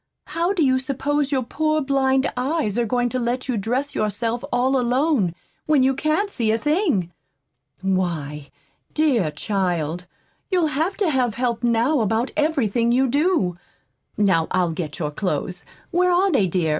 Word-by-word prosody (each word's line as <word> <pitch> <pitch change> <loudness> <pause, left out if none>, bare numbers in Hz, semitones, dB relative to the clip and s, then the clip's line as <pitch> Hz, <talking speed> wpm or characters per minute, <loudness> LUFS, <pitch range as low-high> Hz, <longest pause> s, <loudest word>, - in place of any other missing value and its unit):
How 340 +3 -1
do 350 -7 +2
you 260 -1 +3
suppose 280 +2 -1
your 265 -2 +1
poor 310 +5 0
blind 270 -1 +1
eyes 255 -4 -1
are 240 -1 0
going 245 +2 +1
to 255 - -2
let 245 +2 -2
you 255 - 0
dress 250 +7 -2
yourself 225 +3 -1
all 255 +2 +2
alone, 250 - +1 0.3
when 300 -4 +4
you 265 +1 +3
can't 310 +9 0
see 230 - -1
a 220 - +3
thing? 295 - 0 0.7
Why, 160 -7 -2 0.5
dear 265 - +2
child, 180 -2 -2 0.4
you'll 360 -4 +2
have 325 +8 -1
to 395 -6 +1
have 250 -5 +1
help 240 -2 -1
now 240 +5 +2
about 225 +4 0
everything 250 -7 +1
you 260 +2 +3
do. 285 - +1 0.6
Now 185 -6 +2
I'll 180 -2 +1
get 160 -2 -5
your 150 -3 -2
clothes. 175 +1 -3 0.2
Where 360 +1 +3
are 370 +2 +3
they, 210 - +3
dear? 175 -2 0
245 Hz, 160 wpm, -22 LUFS, 195-290 Hz, 0.7 s, when